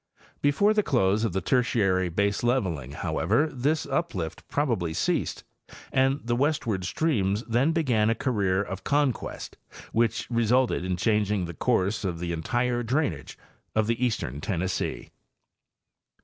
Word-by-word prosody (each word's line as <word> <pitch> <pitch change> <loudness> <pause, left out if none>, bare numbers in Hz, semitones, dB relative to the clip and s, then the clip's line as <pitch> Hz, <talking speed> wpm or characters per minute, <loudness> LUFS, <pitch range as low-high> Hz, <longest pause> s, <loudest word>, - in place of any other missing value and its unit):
Before 175 +9 +3
the 215 - +3
close 110 - +2
of 115 - 0
the 95 +2 -1
Tertiary 95 -6 +2
baseleveling, 100 - 0
however, 110 - +1
this 145 +5 0
uplift 135 - -3
probably 110 - -1
ceased - - -1 0.5
and 135 +1 +2
the 120 0 0
westward 125 - 0
streams 105 - 0
then 120 +7 +2
bezan 125 -10 +2
a 115 - +2
career 100 -6 0
of 95 -1 -6
conquest 145 -3 -1 0.3
which 115 0 +1
resulted 120 -2 +2
in 90 -1 -1
changing 105 -1 +1
the 85 - -6
course 100 +7 0
of 90 -3 -2
the 85 0 -3
entire 120 +9 0
drainage 130 +6 -2 0.4
of 110 +1 +2
eastern 115 - -1
Tennessee. 95 0 -2
110 Hz, 130 wpm, -26 LUFS, 95-130 Hz, 0.5 s, Before